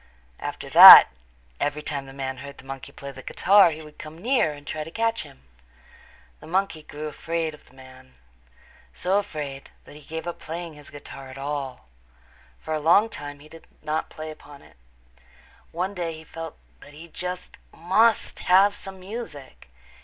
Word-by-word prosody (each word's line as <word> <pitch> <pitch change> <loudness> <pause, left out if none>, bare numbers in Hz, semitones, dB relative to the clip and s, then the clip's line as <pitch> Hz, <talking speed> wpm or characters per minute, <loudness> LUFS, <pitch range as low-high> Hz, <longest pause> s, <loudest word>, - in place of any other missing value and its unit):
After - - -6
that - - +12 0.5
every 145 +1 -2
time 140 -3 -4
the - - -11
man 135 -1 -5
heard 140 +2 -10
the - - -15
monkey 135 -2 -8
play 140 0 -9
the 135 -1 -11
guitar 195 +6 +4
he 160 0 -7
would 150 -1 -16
come 155 +1 -10
near 230 - +1
and 145 -1 -12
try 155 +1 -4
to 155 - -10
catch 225 +5 -1
him. 65 - -14 1.0
The - - -13
monkey 180 -2 -1
grew 150 0 -9
afraid 165 +1 -3
of 150 - -17
the - - -22
man, 130 - -16 0.8
so 190 +3 +1
afraid 145 -8 -7 0.2
that - - -14
he 150 - -13
gave 160 +3 -7
up 175 - -6
playing 170 +1 -7
his 150 -1 -14
guitar 135 -2 -11
at 130 - -11
all. 140 - -5 0.7
For 160 - -5
a 155 - -1
long, 165 +7 +5
long 225 - -7
time 145 0 -7
he 150 - -14
did 165 +1 -15 0.2
not 155 +1 -2
play 155 0 -8
upon 145 -2 -14
it. - - -21 0.9
One 185 +4 -3
day 170 -3 -4
he 160 0 -11
felt 165 0 -9 0.2
that 145 - -15
he 160 +3 -12
just 180 +2 -7
must 205 +7 +1
have 195 +3 +4
some 195 -2 -9
music. 185 - -9
155 Hz, 185 wpm, -24 LUFS, 145-175 Hz, 1.0 s, that